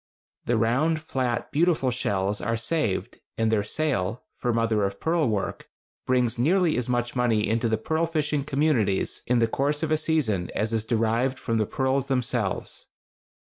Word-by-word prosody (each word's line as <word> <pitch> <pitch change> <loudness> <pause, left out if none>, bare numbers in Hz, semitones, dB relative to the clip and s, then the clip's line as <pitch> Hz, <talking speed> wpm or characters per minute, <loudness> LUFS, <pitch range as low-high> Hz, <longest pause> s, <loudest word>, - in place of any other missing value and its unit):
The 120 - +1
round, 135 +9 +2
flat, 130 -4 -2
beautiful 155 -4 +2
shells 100 -4 -1
are 115 0 -1
saved, 115 - -2 0.2
and 115 -1 +1
their 105 -2 +2
sale 120 -4 -1
(for 120 - -1
mother 115 -2 +1
of 100 0 -2
pearl 160 -5 +1
work) 105 -3 -3 0.4
brings 125 -2 +1
nearly 170 +5 +3
as 125 0 -2
much 120 0 -1
money 115 -3 +2
into 115 +1 +1
the 110 - +1
pearl 160 +9 0
fishing 150 -3 -1
communities 135 -9 +1
in 125 - +3
the 115 -1 +3
course 145 +6 -1
of 160 - -1
a 155 - +4
season 140 - 0
as 110 +1 -1
is 110 -1 0
derived 115 +3 +1
from 115 -1 -1
the 110 - +1
pearls 135 0 0
themselves. 125 -6 -2
120 Hz, 170 wpm, -26 LUFS, 110-150 Hz, 0.4 s, a